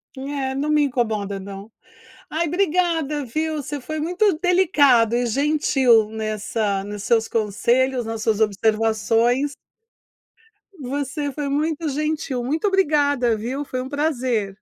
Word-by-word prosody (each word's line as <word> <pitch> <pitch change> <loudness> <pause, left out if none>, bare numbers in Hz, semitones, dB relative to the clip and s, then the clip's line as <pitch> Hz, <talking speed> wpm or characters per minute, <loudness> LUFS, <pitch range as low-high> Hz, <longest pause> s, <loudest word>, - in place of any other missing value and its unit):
É, 270 0 -3
não 285 +3 -2
me 300 -1 +3
incomoda 215 -7 -1
não. 200 +2 -9 0.6
Ai, 335 +2 0
obrigada 325 -4 0
viu, 310 +6 -2
você 290 +1 -5
foi 310 +4 -5
muito 355 +2 +1
delicado 295 - +4
e 245 0 +1
gentil 265 -4 +3
nessa 215 -2 -2
nos 205 0 -6
seus 225 0 +1
conselhos, 240 +4 +1
nas 225 -1 -5
suas 220 -1 +1
observações. 225 +5 +1 1.3
Você 280 +2 -3
foi 285 0 -4
muito 310 +2 -1
gentil, 295 -3 -2
muito 310 - 0
obrigada, 290 - +2
viu. 255 +6 -4
Foi 255 -1 -4
um 260 - -7
prazer. 255 -9 -1
265 Hz, 125 wpm, -22 LUFS, 225-300 Hz, 1.3 s, delicado